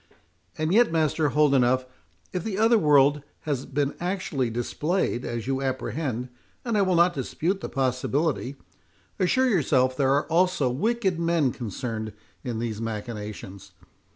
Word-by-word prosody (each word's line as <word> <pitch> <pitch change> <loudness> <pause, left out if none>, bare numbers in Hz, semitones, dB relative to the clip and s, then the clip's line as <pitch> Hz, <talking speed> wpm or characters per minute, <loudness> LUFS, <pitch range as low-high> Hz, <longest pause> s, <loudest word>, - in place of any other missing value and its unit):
"And 155 +3 0
yet, 235 -3 +5
Master 155 -1 +1
Holdenough, 130 -3 +3 0.5
if 180 -2 -2
the 205 -4 -3
other 225 +1 +4
world 145 -2 +4 0.2
has 140 -4 -3
been 140 +1 -1
actually 175 -8 -1
displayed, 125 +4 -1
as 120 -2 -4
you 135 +1 -1
apprehend, 130 -1 -3 0.4
and 235 -2 -1
I 205 - +3
will 185 -2 +2
not 175 +1 +4
dispute 170 +7 -2
the - - -5
possibility, 135 +2 -1 0.6
assure 255 +8 +3
yourself 135 - +2
there 135 0 +2
are 145 - +1
also 170 -6 +2
wicked 195 - 0
men 165 -5 +2
concerned 110 -1 -5 0.3
in 120 -4 -3
these 115 -1 -3
machinations. 105 -3 -6
140 Hz, 140 wpm, -26 LUFS, 125-175 Hz, 0.6 s, yet